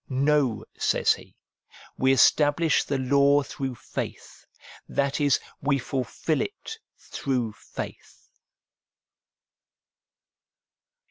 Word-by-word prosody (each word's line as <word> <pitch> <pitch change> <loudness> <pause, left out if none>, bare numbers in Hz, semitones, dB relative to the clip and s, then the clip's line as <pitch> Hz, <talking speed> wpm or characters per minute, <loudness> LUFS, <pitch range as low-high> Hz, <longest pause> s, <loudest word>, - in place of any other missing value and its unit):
No, 135 -3 +1
says - - +3
he, - - -14 0.3
' - - -21
we 130 0 +4
establish 145 +4 +4
the 140 - -2
law 140 +2 +3
through 135 -2 -5
faith,' - - -7 0.4
that 140 +1 0
is, 145 -2 +3 0.2
we 140 0 +2
fulfil 135 +4 -2
it 445 +2 -6 0.2
through 125 -5 -2
faith. 100 - -9
140 Hz, 90 wpm, -26 LUFS, 130-145 Hz, 0.4 s, we